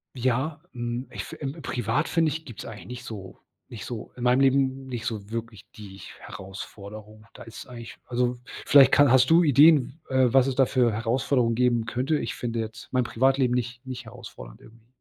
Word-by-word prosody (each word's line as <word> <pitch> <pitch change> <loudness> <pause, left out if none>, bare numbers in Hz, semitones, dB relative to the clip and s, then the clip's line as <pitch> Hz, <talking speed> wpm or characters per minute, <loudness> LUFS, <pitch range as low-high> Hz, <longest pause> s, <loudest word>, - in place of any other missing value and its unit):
Ja, 130 +5 -1
hm, 120 +1 -4
ich - - -5
fi - - -9 0.3
privat 125 +5 -1
finde 165 -2 +2
ich, 160 +2 -5
gibt 120 -8 -10
es - - -8
eigentlich 100 -5 -9
nicht 125 +3 -8
so 100 -6 -9 0.3
nicht 115 - -8
so 120 -3 -7
in 125 - -5
meinem 125 +2 +4
Leben 135 0 +2
nicht 120 -3 -5
so 105 -2 -5
wirklich 115 -3 -6
die 100 -2 -11 0.2
Herausforderung. 105 +2 -10
Da - - -11
ist 115 - -10
eigentlich 120 -2 -10
also, 125 0 0 0.3
vielleicht 140 -2 +7
kann 145 -2 +5
hast 130 +1 +5
du 170 +2 +6
Ideen, 145 0 +5
w - - -6
äh, 130 -2 +4
was 135 0 +5
es 130 - -2
da 135 -2 +4
für 120 -4 +2
Herausforderungen 115 +2 0
geben 120 -1 +1
könnte? 130 +6 -1
Ich - - -4
finde 115 -1 -4
jetzt 110 -1 -6
mein 125 -1 +1
Privatleben 130 +1 +2
nicht 125 0 -4
nicht 130 -1 -7
herausfordernd - - -11
irgendwie. 115 0 -19
125 Hz, 195 wpm, -25 LUFS, 115-130 Hz, 0.3 s, vielleicht